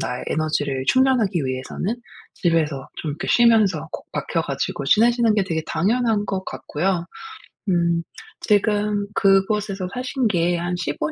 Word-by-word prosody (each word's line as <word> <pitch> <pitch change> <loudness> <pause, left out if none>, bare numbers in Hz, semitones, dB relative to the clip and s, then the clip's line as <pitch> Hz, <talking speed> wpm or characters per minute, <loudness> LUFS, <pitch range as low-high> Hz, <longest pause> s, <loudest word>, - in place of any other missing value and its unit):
나의 125 0 -3
에너지를 145 -4 -1
충전하기 235 - +3
위해서는 130 - -3 0.4
집에서 155 -6 0
좀 155 - -2
이렇게 165 +7 -5
쉬면서 215 -10 +3
콕 - - -7
박혀 - - -1
가지고 140 - -3
지내시는 230 - +4
게 205 - +2
되게 160 -3 -2
당연한 220 +1 +1
것 190 -2 -3
같고요. 175 +2 -2 0.7
음 170 -2 +2 0.4
지금 210 -1 +1
그곳에서 195 0 +2
사신 255 -1 -1
게 175 -3 +1
한 175 +1 -2
15 150 -2 -2
190 Hz, 295 characters per minute, -22 LUFS, 160-215 Hz, 0.7 s, 지내시는